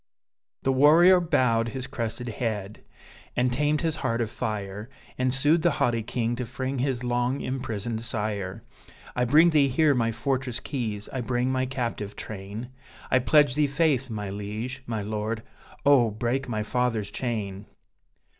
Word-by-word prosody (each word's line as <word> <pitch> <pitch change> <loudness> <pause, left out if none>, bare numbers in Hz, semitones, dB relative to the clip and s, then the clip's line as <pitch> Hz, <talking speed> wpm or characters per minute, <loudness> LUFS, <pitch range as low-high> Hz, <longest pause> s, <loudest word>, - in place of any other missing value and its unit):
The 135 - +2
warrior 165 +7 +7
bowed 120 -9 +2
his 130 +2 -4
crested 120 0 -4
head, 110 -3 -4 0.5
and 125 0 +2
tamed 150 +3 +1
his 160 -2 -1
heart 115 0 -1
of 115 -2 -1
fire, 105 +1 -4 0.3
And 130 0 +1
sued 145 +5 +3
the 170 - +4
haughty 115 -2 +2
king 115 +1 -1
to 125 - -2
free 130 +1 -3
his 130 -2 -1
long 125 +2 0
imprisoned 115 -3 -3
sire: 105 -5 -3 0.5
"I 125 - +2
bring 155 +7 +6
thee 145 -3 +4
here 145 +3 +3
my 115 -3 +1
fortress 125 +1 -2
keys, 110 -6 -4
I 130 - -3
bring 125 +2 0
my 130 0 0
captive 115 -5 -3
train, 105 +3 -7 0.4
I 130 - +5
pledge 145 0 +4
thee 150 +1 +2
faith, 140 -3 +1
my 105 -3 -4
liege, 105 +6 -5
my 110 -2 -2
lord! 110 +2 -3 0.4
oh, 135 -5 +6
break 120 +5 -2
my 110 -2 -1
father's 115 -3 -1
chain!" 105 -5 -3
120 Hz, 155 wpm, -26 LUFS, 110-135 Hz, 0.5 s, warrior